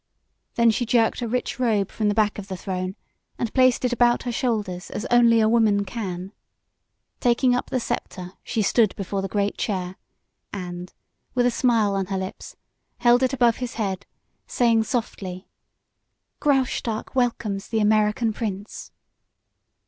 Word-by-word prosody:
Then 235 -1 +5
she 230 - -1
jerked 235 0 +2
a 240 - -1
rich 250 +2 -2
robe 215 -6 +1
from 215 - -1
the 205 - +1
back 215 -1 +1
of 195 - -8
the 190 -2 -5
throne 185 +1 -4 0.4
and 230 - -3
placed 255 -1 +4
it 245 - +1
about 240 0 +3
her 245 - -2
shoulders 215 -8 -2
as 215 - -5
only 235 -1 +6
a 215 - +4
woman 215 -3 +3
can. 190 -3 -5 0.9
Taking 245 +1 +3
up 245 - -1
the 255 - 0
scepter 180 -5 -4
she 220 - -1
stood 215 +1 +3
before 195 0 -3
the 195 - -2
great 200 +1 -1
chair, 185 -3 -2 0.5
and, 180 -2 -6 0.4
with 245 -1 +3
a 245 - +3
smile 230 -4 +2
on 195 -1 -1
her 195 0 -2
lips, 190 0 -6 0.4
held 240 +1 +4
it 260 -1 +2
above 240 -4 +3
his 250 -2 -5
head, 200 -3 -3 0.4
saying 230 -2 +2
softly: 190 -7 -4 0.9
"Graustark 260 -5 0
welcomes 225 -6 -1
the 225 - -1
American 215 +2 +2
prince." 205 -2 -5
220 Hz, 155 wpm, -24 LUFS, 195-240 Hz, 0.9 s, only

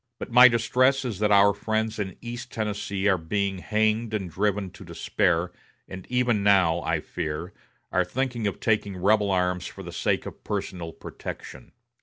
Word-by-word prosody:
But - - -7
my 125 +2 +9
distress 130 +3 +2
is 110 -6 -4
that 105 0 +2
our 100 0 +6
friends 110 +2 -2
in 95 -3 -4
East 120 +1 -7
Tennessee 105 -2 -2
are 95 -3 +3
being 100 +3 -2
hanged 110 +2 0
and 95 -5 -4
driven 100 0 -1
to - - -13
despair, 85 +2 0 0.4
and 95 -1 -9
even 125 -4 +1
now, 95 -4 +4
I 80 -1 0
fear, 85 +2 -5 0.4
are - - +3
thinking 125 -4 -2
of 100 - -3
taking 105 -3 0
rebel 100 +2 +3
arms 90 -1 0
for - - -10
the - - -8
sake - - -1
of - - -9
personal 85 -3 -4
protection. - - -9
100 Hz, 170 wpm, -26 LUFS, 90-110 Hz, 0.4 s, my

